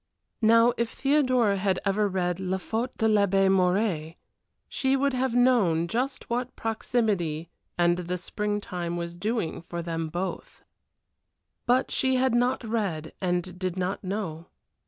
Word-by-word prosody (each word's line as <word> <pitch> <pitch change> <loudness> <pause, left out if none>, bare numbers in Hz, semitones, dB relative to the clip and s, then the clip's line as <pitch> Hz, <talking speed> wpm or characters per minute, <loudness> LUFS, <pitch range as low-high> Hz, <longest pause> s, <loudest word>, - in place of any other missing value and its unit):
Now 230 +2 +5
if 235 -1 0
Theodora 255 -7 +2
had 190 -1 +1
ever 205 +1 +2
read 180 -2 -1
La 190 0 -1
Faute 225 +6 -3
de 220 - +2
L'Abbé 200 -2 +3
Mouret 180 -4 +1 0.5
she 265 0 +1
would 280 0 +1
have 255 -1 0
known 215 -10 +3
just 255 +7 -2
what 245 +1 -2
proximity 205 -8 -1 0.3
and 175 0 +3
the 180 0 -3
spring 205 +3 -2
time 175 -3 -4
was 170 0 -5
doing 210 -2 -2
for 170 0 -6
them 165 -1 -3
both. 180 +4 -5 1.0
But 250 +2 +2
she 260 0 +2
had 260 -1 +2
not 245 +2 +1
read, 200 -9 -2
and 180 0 -2
did 185 -1 -2
not 185 +3 -2
know. 185 -4 -4
195 Hz, 145 wpm, -27 LUFS, 175-235 Hz, 1.0 s, Now